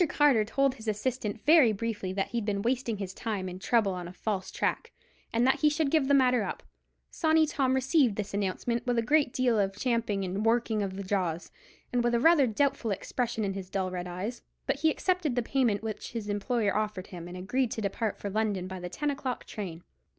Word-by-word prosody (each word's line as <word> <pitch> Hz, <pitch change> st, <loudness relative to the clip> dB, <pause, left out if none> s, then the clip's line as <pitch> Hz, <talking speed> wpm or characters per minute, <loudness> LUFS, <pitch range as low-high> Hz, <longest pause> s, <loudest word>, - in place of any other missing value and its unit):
Carter 285 Hz, -7 st, +4 dB
told 275 Hz, +5 st, +1 dB
his 225 Hz, -3 st, -12 dB
assistant 215 Hz, 0 st, -2 dB
very 300 Hz, -7 st, +7 dB
briefly 210 Hz, -3 st, -3 dB
that 195 Hz, +1 st, -2 dB
he'd 235 Hz, -2 st, -2 dB
been 200 Hz, -1 st, -1 dB
wasting 240 Hz, -2 st, 0 dB
his 195 Hz, -2 st, -5 dB
time 205 Hz, -4 st, -3 dB
and 185 Hz, +1 st, -7 dB
trouble 210 Hz, -2 st, +2 dB
on 180 Hz, -1 st, -5 dB
a -, -, -8 dB
false 190 Hz, 0 st, -3 dB
track, -, -, -2 dB, 0.4 s
and 230 Hz, +2 st, +2 dB
that 265 Hz, -, +3 dB
he 305 Hz, -, +5 dB
should 300 Hz, -1 st, 0 dB
give 310 Hz, -4 st, +3 dB
the 280 Hz, -, +5 dB
matter 250 Hz, -3 st, +4 dB
up. 200 Hz, -, -4 dB, 0.5 s
Sawney 315 Hz, -1 st, +3 dB
Tom 270 Hz, -3 st, +1 dB
received 265 Hz, -, +3 dB
this 205 Hz, -1 st, -4 dB
announcement 205 Hz, +4 st, -1 dB
with 245 Hz, -1 st, +1 dB
a 230 Hz, -, +2 dB
great 290 Hz, +1 st, +3 dB
deal 245 Hz, -4 st, +2 dB
of 195 Hz, 0 st, 0 dB
champing 230 Hz, -5 st, 0 dB
and 190 Hz, +3 st, -2 dB
working 225 Hz, -1 st, +2 dB
of 195 Hz, -2 st, -3 dB
the 200 Hz, -, -5 dB
jaws, 185 Hz, -4 st, -2 dB, 0.4 s
and 245 Hz, -1 st, +2 dB
with 240 Hz, 0 st, +2 dB
rather 290 Hz, +3 st, +5 dB
a -, -, -1 dB
doubtful 270 Hz, +1 st, 0 dB
expression 220 Hz, +3 st, -2 dB
in 195 Hz, -, -1 dB
his 190 Hz, -1 st, -7 dB
dull 190 Hz, -2 st, -1 dB
red 180 Hz, -1 st, -4 dB
eyes; 190 Hz, +7 st, -5 dB, 0.2 s
but -, -, 0 dB
he 320 Hz, +2 st, +4 dB
accepted 360 Hz, -4 st, 0 dB
the 245 Hz, -, +1 dB
payment 230 Hz, -5 st, +1 dB
which 220 Hz, 0 st, -5 dB
his 220 Hz, -3 st, -4 dB
employer 205 Hz, +1 st, 0 dB
offered 210 Hz, -3 st, -2 dB
him, 175 Hz, -2 st, -9 dB
and 180 Hz, +1 st, -8 dB
agreed 235 Hz, +7 st, 0 dB
to 225 Hz, -, -4 dB
depart 210 Hz, +1 st, -2 dB
for 200 Hz, -, -5 dB
London 205 Hz, -3 st, 0 dB
by 185 Hz, 0 st, -6 dB
the 180 Hz, 0 st, -5 dB
ten 295 Hz, +9 st, -1 dB
o'clock 270 Hz, -3 st, -4 dB
train. 175 Hz, -6 st, -6 dB
220 Hz, 220 wpm, -29 LUFS, 195-255 Hz, 0.5 s, very